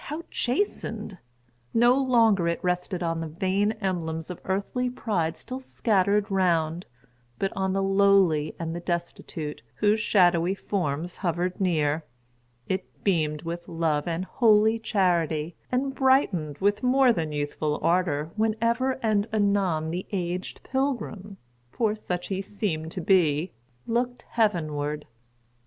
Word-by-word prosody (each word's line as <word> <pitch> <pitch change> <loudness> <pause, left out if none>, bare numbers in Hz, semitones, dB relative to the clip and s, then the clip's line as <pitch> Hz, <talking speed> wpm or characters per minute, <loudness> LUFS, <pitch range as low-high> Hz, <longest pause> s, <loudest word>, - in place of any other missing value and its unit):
how 305 +4 -5
chastened! 255 - -2 0.6
No 240 +2 +6
longer 230 -9 +3
it 170 - -1
rested 180 0 -1
on 165 -1 -1
the 165 - -3
vain 190 +6 0
emblems 175 -6 -3
of 180 - -8
earthly 200 +6 -1
pride 170 -10 -1
still 255 +10 -7
scattered 205 -5 +1
round; 175 -3 +1 0.5
but 195 - -1
on 190 0 0
the 195 0 +1
lowly 195 -6 +3
and 165 0 -4
the - - -3
destitute, 170 -3 -4
whose 210 +5 +2
shadowy 180 -4 +3
forms 175 -4 -3
hovered 180 +1 -2
near, 155 -4 +1 0.6
it 190 0 -4
beamed 155 -6 +1
with 170 +1 -5
love 160 -3 0
and 170 +2 -2
holy 220 0 +4
charity; 170 -7 0 0.2
and 270 +2 0
brightened 210 - +2
with 205 +1 +1
more 255 -1 +4
than 160 -6 -2
youthful 150 +1 -2
ardor 165 -3 +1
whenever 230 +4 +1
and 210 -1 +2
anon 200 -7 +1
the 180 +2 -4
aged 180 -2 -3
pilgrim—for 205 - -3
such 180 -4 -4
he 190 -1 -1
seemed 190 -6 -3
to 180 - -4
be—looked 170 - 0
heavenward. 155 -9 0
185 Hz, 125 wpm, -26 LUFS, 165-215 Hz, 0.6 s, No